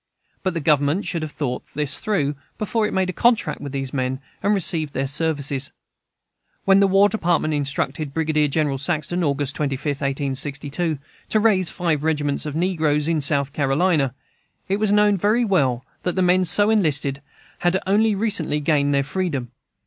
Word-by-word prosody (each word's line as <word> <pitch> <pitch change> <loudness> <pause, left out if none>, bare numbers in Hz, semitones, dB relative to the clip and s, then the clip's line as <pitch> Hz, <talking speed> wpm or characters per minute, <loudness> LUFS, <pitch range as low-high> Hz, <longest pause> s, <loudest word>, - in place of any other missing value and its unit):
But 185 -3 -2
the - - 0
Government 145 +4 +2
should 170 - -2
have 155 -1 -5
thought 125 -5 -3
of - - -29
this 150 -1 +1 0.6
before 215 +1 0
it - - -5
made 190 -1 0
the - - -2
contract 235 +4 +1
with 145 -2 -6
these 135 -1 -4
men 130 -1 -1 0.2
and 205 - +1
received 160 -5 -1
their 135 +2 -1
services. 140 -2 -1 0.9
When 195 0 +5
the 200 - +5
War 195 +1 +5
Department 175 -6 0
instructed 145 +1 -2
Brigadier 155 0 +1
General 145 -2 0
Saxton, 170 +3 -1
August 145 -2 0
25, 140 -2 -2
1862, 145 +2 -1 0.3
to 215 - +2
raise 200 -5 +3
five 165 -5 -1
regiments 150 -2 -1
of 150 - -5
negroes 160 -4 +1
in 165 -2 +1
South 140 -1 +1
Carolina, 140 -1 +1 0.5
it 195 - 0
was 210 -1 +1
known 210 -1 +4
very 215 +6 +2
well 135 - +1 0.2
that 180 - -2
the 185 - +2
men 180 +1 +3
so 205 +5 +3
enlisted 145 -9 +2 0.4
had 175 +1 +2
only 210 +2 +3
recently 190 -8 0
gained 145 -1 +1
their 140 - +2
freedom. 145 -6 -3
155 Hz, 170 wpm, -22 LUFS, 140-185 Hz, 0.9 s, When